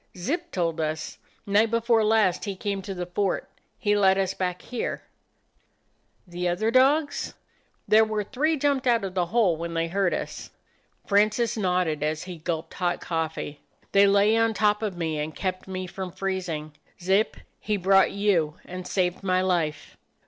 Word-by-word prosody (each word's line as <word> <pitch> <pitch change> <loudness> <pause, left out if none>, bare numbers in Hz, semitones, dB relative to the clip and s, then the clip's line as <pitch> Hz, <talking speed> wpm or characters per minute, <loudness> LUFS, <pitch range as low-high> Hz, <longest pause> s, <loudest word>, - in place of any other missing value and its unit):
"Zip 295 - -2
told 165 -3 -1
us. 155 0 -3 0.3
Night 210 +3 +3
before 230 0 +2
last 215 -4 +2
he 200 -2 -3
came 200 +1 -3
to 195 0 -6
the 180 0 -3
fort. 190 +3 -1 0.3
He 205 -3 +1
led 190 -2 +4
us 190 -1 0
back 180 -1 -3
here." 245 - -4 1.2
"The 175 0 -3
other 200 +6 0
dogs?" 285 +4 +2 0.5
"There 220 +1 +6
were 215 -1 -1
three 305 +9 0
jumped 275 -2 +1
out 235 -3 +3
of 190 -2 -4
the 180 -2 0
hole 190 -4 +2
when 170 +1 -5
they 165 0 0
heard 190 0 +1
us." - - -4 0.6
Francis 215 +3 +2
nodded, 180 -7 0
as 155 +1 -1
he 180 -3 -8
gulped 160 0 -4
hot 175 -1 -1
coffee. 160 -3 -3 0.3
"They 200 0 +6
lay 200 +2 +4
on 225 -1 +2
top 210 0 +2
of 205 -5 -3
me 160 -3 -2
and 150 +1 -4
kept 185 -1 -3
me 185 -1 -4
from 185 0 -6
freezing. 180 -5 -3 0.3
Zip 190 +4 +1
— - - -43
he 210 -1 -1
brought 195 +1 +4
you 185 -7 +1
and 180 0 -7
saved 180 -2 0
my 185 -1 +1
life! 170 -5 -1
190 Hz, 170 wpm, -26 LUFS, 175-215 Hz, 1.2 s, There